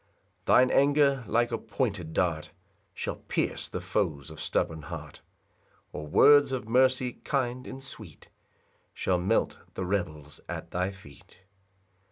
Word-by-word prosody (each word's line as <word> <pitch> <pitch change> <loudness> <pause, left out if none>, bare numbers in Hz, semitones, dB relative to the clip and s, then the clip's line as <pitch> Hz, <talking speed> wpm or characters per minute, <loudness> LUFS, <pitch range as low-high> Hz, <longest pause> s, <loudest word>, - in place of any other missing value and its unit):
4 - - +6
Thine 125 0 +6
anger, 140 -2 +4
like 120 +1 +2
a 115 - -1
pointed 105 -8 -2
dart, 80 -3 0 0.4
Shall - - -4
pierce - - -2
the - - -4
foes 70 0 -2
of 80 - -9
stubborn 80 -1 -1
heart; 70 - -8 0.7
Or 75 - -6
words 145 - +6
of 130 -4 -3
mercy 130 +1 +3
kind 130 -2 -2
and 135 - -8
sweet 105 - -9 0.7
Shall 90 -1 +1
melt 90 +2 +1 0.2
the 95 - -3
rebels 80 -6 -3
at - - -6
thy 90 +2 -1
feet. 90 -1 -16
105 Hz, 140 wpm, -28 LUFS, 80-130 Hz, 0.7 s, 4